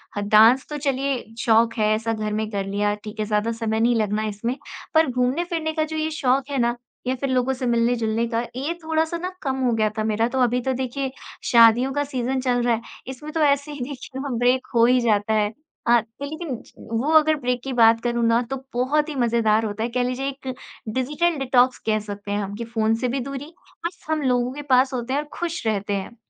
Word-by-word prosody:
हाँ, 205 - -2
डांस 225 +5 +6
तो 300 - -4
चलिए 275 -1 0 0.2
शौक 230 -2 +3
है, 215 -1 +2
ऐसा 225 +1 -2
घर 215 -1 -3
में 215 0 -1
कर 200 -1 -2
लिया 205 +1 0
ठीक 215 0 -9
है। 215 - 0
ज़्यादा 210 +2 0
समय 225 -1 -2
नहीं 235 +1 +3
लगना 215 0 0
इसमें, 230 +5 -3 0.4
पर 320 -1 +5
घूमने-फिरने 315 +6 -1
का 310 -1 +1
जो 315 0 -5
ये 310 0 0
शौक 270 -2 +1
है 280 - -2
ना, 240 0 +1 0.3
या 260 - +1
फिर 275 +1 -3
लोगों 260 +1 +1
से 255 0 -4
मिलने-जुलने 235 -1 +1
का, 230 0 -1
ये 285 +6 -2
थोड़ा-सा 320 +1 0
ना 360 +2 -3
कम 265 -2 -1
हो 240 - +3
गया 215 -1 +2
था 215 - 0
मेरा। 220 +1 +1
तो 265 +1 -2
अभी 245 0 +2
तो 265 +1 -1
देखिए, 265 +1 -3 0.4
शादियों 235 +3 +6
का 290 0 0
सीज़न 260 -1 -2
चल 245 -2 +1
रहा 240 -1 +3
है, 225 - -6 0.3
इसमें 285 +4 -7
तो 325 - -1
ऐसे 285 0 +2
ही 290 - -7
देखिए 265 -1 -7
ना, 280 0 -4
ब्रेक 250 +2 +2
हो 230 0 +6
ही 250 +1 +4
जाता 215 -1 +2
है। 210 -1 +2 0.4
अ, 240 0 +6 0.2
लेकिन 305 -1 -4
ज - - -19 0.3
वो 295 +5 0
अगर 310 0 +4
ब्रेक 250 -1 -1
की 270 - -4
बात 225 -1 +5
करूँ 240 -1 0
ना 230 +1 +3
तो 270 - -1 0.2
बहुत 295 +5 +1
ही 295 - -5
मज़ेदार 225 -3 +2
होता 210 +1 -3
है, 240 - -1
कह 245 +1 0
लीजिए 255 +2 -2
एक 265 -1 -5 0.4
डिजिटल 300 +6 0
डिटॉक्स 255 -1 +3
कह 215 -1 +2
सकते 205 -1 -7
हैं 205 - 0
हम 200 +1 -5
कि 235 - -5
फ़ोन 225 -1 +1
से - - +3
भी 265 +3 -1
दूरी 275 +5 -6 0.3
और 345 - 0
सब 315 -3 -3
लोगों 250 0 +1
के 290 - -6
पास 260 +1 +4
होते 250 +1 -3
हैं 285 - +2
और 300 - -11
खुश 335 -7 -3
रहते 205 -1 -1
हैं। 200 +4 -4
245 Hz, 235 wpm, -23 LUFS, 225-275 Hz, 0.4 s, डांस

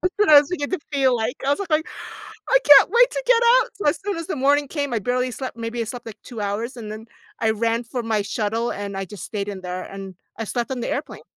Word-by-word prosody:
That's 365 +1 +1
what 420 0 +2
I 295 -1 +10
was 285 - -6
beginning 360 +1 -2
to - - -29
feel 265 -3 +3
like. 225 +1 -2
I - - +2
was 285 - +2
like 395 - -4
going, 310 0 +2 0.7
"I - - +5
can't 290 +3 +8
wait 485 +2 +5
to - - -3
get 485 -1 +4 0.2
out," - - -1
so 405 - -3
as 295 +1 +2
soon 410 - -1
as 335 -1 -6
the - - -2
morning 285 +1 +2
came 285 -3 -3
I 225 - +1
barely 250 +4 -1
slept, 255 0 -6
maybe 230 +1 -4
I - - +1
slept 240 +1 -8
like 225 -3 -10
2 240 -3 -9
hours, 210 +5 -3
and 215 -3 -7
then 215 +1 -9 0.3
I 225 - +2
ran 230 +2 0
for 240 +1 -5
my 220 -2 0
shuttle 225 +3 -2
and 200 -1 -5
I 195 - -3
just 190 -1 -10
stayed 205 -2 -4
in 195 -2 -6
there 180 0 -5
and 195 -1 -9 0.2
I 225 - -3
slept 240 +3 -3
on 260 - -3
the - - -3
airplane. - - -4
240 Hz, 280 wpm, -22 LUFS, 215-290 Hz, 0.7 s, I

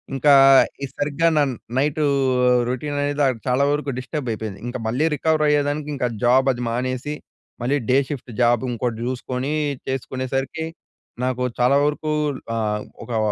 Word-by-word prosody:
ఇంకా 145 +2 +5 0.5
ఈ - - +1
సరిగ్గా 150 +3 +1
నా 150 - +5 0.3
నైట్ 145 +3 +1 0.7
రొటీన్ 145 +4 -3
అనేది 145 +1 -1 0.3
చాలా 125 +2 +2
వరకు 145 -1 -1
డిస్టర్బ్ 135 +1 -5
అయిపోయింది. 110 -3 -5
ఇంక 120 - -4
మళ్ళీ 130 +7 +1
రికవర్ 155 +2 +1
అయ్యేదానికి 145 0 +1
ఇంకా 125 -2 0 0.2
జాబ్ 130 +2 +4
అది 125 -1 -5
మానేసి, 130 +4 -2 0.5
మళ్ళీ 135 +4 +1
డే 130 - +5
షిఫ్ట్ 135 -4 -6
జాబ్ 120 0 +4
ఇంగోటి 120 -1 -2
జూసుకొని 130 +2 -3 0.3
జేసుకునేసరికి 135 +3 -3 0.6
నాకు 125 0 -1 0.2
చాలా 125 +3 +4
వరకూ 150 +1 -1 0.5
ఆహ్, 105 -2 -1 0.2
ఒకా 120 -2 -2
130 Hz, 140 wpm, -22 LUFS, 125-145 Hz, 0.7 s, ఇంకా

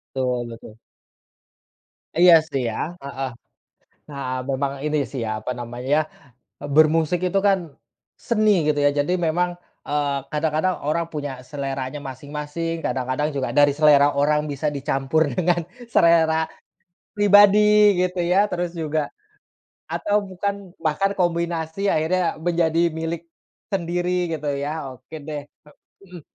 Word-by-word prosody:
Tul 125 -2 -1
betul. 115 -1 -11 1.4
Iya 175 0 +7
sih, 135 -5 -3
ya. 155 +9 -4
Heeh. 135 -1 -4 0.8
Nah 140 -1 -6 0.3
memang 135 +1 -1
ini 150 0 0
sih 130 - -5
ya, - - -2
apa 125 - -3
namanya, 125 +4 -2 0.8
bermusik 160 +2 +4
itu 195 +2 +1
kan 195 -1 +4 0.6
seni, 215 -3 +1 0.2
gitu 145 -1 +2
ya. - - +6
Jadi 175 +5 -1
memang, 175 +2 +1 0.4
eee, 145 -1 0 0.2
kadang-kadang 155 +4 0
orang 170 +2 0
punya 145 -2 -4 0.2
seleranya 135 -1 -4
masing-masing, 145 +4 -5
kadang-kadang 130 +4 -1
juga 135 - -1
dari 145 -1 +6
selera 145 -2 +5
orang 150 +1 +2
bisa 145 +1 -3
dicampur 140 +2 0
dengan 175 -1 +2 0.3
selera 160 -1 +4 0.7
pribadi, 205 0 +6
gitu 180 0 -1
ya. 180 +4 +3
Terus 175 -1 -2
juga, 155 -2 -1 0.8
atau 205 0 0
bukan 195 +2 -3 0.3
bahkan 175 +6 +1
kombinasi 170 -1 -1
akhirnya 170 +2 +1
menjadi 170 0 +1
milik 165 +1 -4 0.5
sendiri, 175 0 -1
gitu 150 -1 -5
ya. 145 -2 -4
Oke 130 +5 -12
deh, 150 -2 -5
eee, 150 - -23 0.3
mhm, 180 -3 -11
155 Hz, 125 wpm, -22 LUFS, 145-175 Hz, 1.4 s, Iya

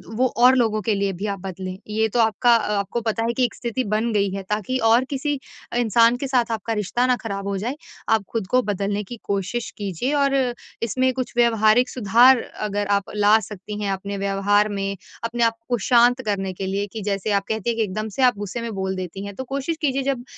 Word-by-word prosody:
वो 255 +3 +3 0.2
और 255 +1 +8
लोगों 220 -3 +1
के 215 +2 0
लिए 195 0 0
भी 190 +4 -5
आप 200 -1 -3
बदलें। 185 0 -6
ये 220 +1 +1
तो 240 - -1
आपका 230 +2 +4
अ, 210 -2 0
आपको 200 +4 -3
पता 225 0 -1
है 235 - 0
कि 255 - +3
एक 235 - -4
स्थिति 240 +1 -2
बन 215 +3 0
गई 200 -2 +2
है 195 0 -4
ताकि 210 +4 -1
और 235 +3 +5
किसी 290 +1 -1 0.4
इंसान 230 0 +4
के 275 - -3
साथ 245 -3 +1
आपका 225 0 -2
रिश्ता 215 +4 0
ना 250 - +3
ख़राब 200 -2 -4
हो 200 -1 -1
जाए, 240 +8 -3 0.3
आप 220 -2 +3
खुद 220 -5 -2
को 255 +4 +3
बदलने 205 0 -2
की 235 +4 -9
कोशिश 200 +4 -2
कीजिए। 205 - -2
और 280 -1 +2 0.5
इसमें 255 +3 +1
कुछ 255 -1 -4
व्यावहारिक 230 +1 +4
सुधार 245 +3 +5
अगर 205 -1 -4
आप 200 - -6
ला 210 +1 +5
सकती 210 0 -7
हैं 200 - -1
अपने 200 +1 -4
व्यवहार 200 +1 +2
में, 195 -1 -3 0.3
अपने 235 +1 -1
आप 230 0 +2
को 245 - +2
शांत 245 +1 +5
करने 195 -2 -1
के 190 +1 -5
लिए 200 +1 -1
कि 220 - -5
जैसे 200 +2 -1
आप 200 -1 +2
कहती 220 +1 -1
हैं 230 - -1
कि 225 - +2
एकदम 215 +2 -3
से - - 0
आप 245 -5 +4
गुस्से 230 +3 -4
बोल 190 -1 -2
देती 185 +2 -6
हैं, 200 -1 -7
तो 260 - -5
कोशिश 275 +5 -3
कीजिए 275 -2 +1
जब 260 -3 -1
215 Hz, 225 wpm, -22 LUFS, 200-240 Hz, 0.5 s, और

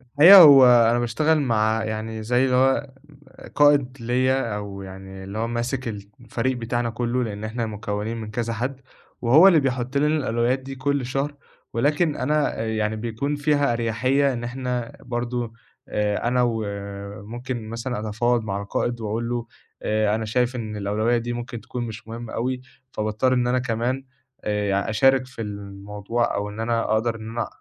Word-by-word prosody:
الحقيقة 145 +10 +8
هو 140 -4 +9
أنا 120 -1 +5
باشتغل 150 +7 +1
مع 110 -3 +1
يعني 110 0 -4
زي 120 +4 +2
اللي 125 -1 +2
هو 135 +1 +2 0.5
م - - -12
قائد 145 -3 +4
ليّا 125 -1 +1
أو 100 -1 -6
يعني 95 0 -9
اللي 100 +3 -7
هو 115 - -1
ماسك 120 +2 -2
الت 100 -2 -6
الفريق 120 +1 -2
بتاعنا 120 0 -2
كُلّه 120 +2 -1
لإن 105 -2 -5
إحنا 115 +2 -3
مكوّنين 105 +1 -4
من 110 -1 -6
كذا 115 0 -2
حَد 130 +4 -4 0.4
وهو 140 +10 +7
اللي 170 -5 +6
بيحُط 130 0 -1
لنا 145 +2 +3
الألويات 125 -1 0
دي 135 +1 -8
كل 140 0 -1
شهر، 135 +3 -2 0.4
ولكن 150 +6 +1
أنا 150 +1 0
آآ 110 - -2
يعني 110 0 -1
بيكون 120 +6 -3
فيها 145 -3 +1
أريحيّة 130 +5 +1
إن 120 -1 -5
إحنا 125 -1 -4
برضه 120 -1 -3 0.3
آآ 105 +2 -1
أنا 125 +1 +2
و 115 -2 0 0.6
ممكن 120 0 -6
مثلًا 115 +1 -4
أتفاوض 120 +2 +1
مع 100 -1 -3
القائد 120 +4 -2
وأقول 110 +2 -2
له 120 -1 -2 0.4
آآ 105 -1 +1
أنا 110 0 -3
شايف 125 +3 0
إن 110 -3 -5
الأولوية 105 +4 0
دي 120 +1 -3
ممكن 120 -1 -6
تكون 125 +2 -5
مش 110 0 -9
مهمّة 115 0 -7
أوي، 125 +2 -2 0.3
فباضطر 110 +4 0
إن 125 -1 +1
أنا 125 +1 +2
كمان 125 +2 -2 0.4
آآ 105 -1 -1
يع 100 +2 0
أشارك 130 +4 +3
في 125 -3 -9
الموضوع 105 +2 -3
أو 100 0 -2
إن 105 +2 -9
أنا 115 0 0
أقدر 115 +1 +1
إن 110 0 -8
أنا 115 0 -3
120 Hz, 175 wpm, -23 LUFS, 110-130 Hz, 0.6 s, هو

